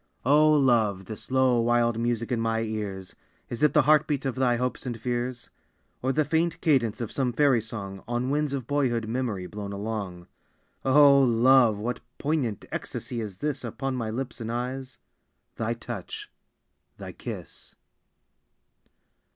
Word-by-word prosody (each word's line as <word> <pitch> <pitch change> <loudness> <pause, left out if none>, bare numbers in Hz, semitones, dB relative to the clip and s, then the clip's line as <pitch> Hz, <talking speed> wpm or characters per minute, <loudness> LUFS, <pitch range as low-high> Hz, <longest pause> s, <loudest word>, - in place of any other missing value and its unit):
O 150 +3 +5
Love, 115 -9 +3
this 110 +3 -8
low, 130 -2 +3
wild 120 0 +2
music 115 0 -1
in 120 -2 0
my 115 0 0
ears, 105 -4 -4 0.4
Is 120 - -5
it 150 - +4
the 150 - +5
heart 150 +1 +4
beat 145 -3 -1
of 135 - 0
thy 125 -1 +2
hopes 125 +2 -2
and 120 -2 -4
fears, 120 0 -3 0.5
Or 130 - +1
the 155 +2 +1
faint 165 +1 0
cadence 130 - +2
of 115 - -4
some 130 -3 0
fairy 130 -2 +3
song 100 -3 -7
On 120 +2 -1
winds 150 -1 0
of 130 -4 -4
boyhood 120 -5 0
memory 115 -6 -2
blown 100 +1 -6
along? 100 -4 -4 0.6
O 140 +1 +7
Love, 120 -2 +5
what 120 +4 -3 0.2
poignant 140 -8 -1
ecstasy 120 -2 -4
is 100 -4 -6
this 145 +2 -2
Upon 130 +3 -3
my 115 -3 -2
lips 125 +2 -5
and 115 0 -3
eyes? 130 +2 -4 0.6
Thy 115 +1 -1
touch, 115 -5 -7 0.7
thy - - -7
kiss. - - -9
120 Hz, 155 wpm, -27 LUFS, 110-135 Hz, 0.7 s, O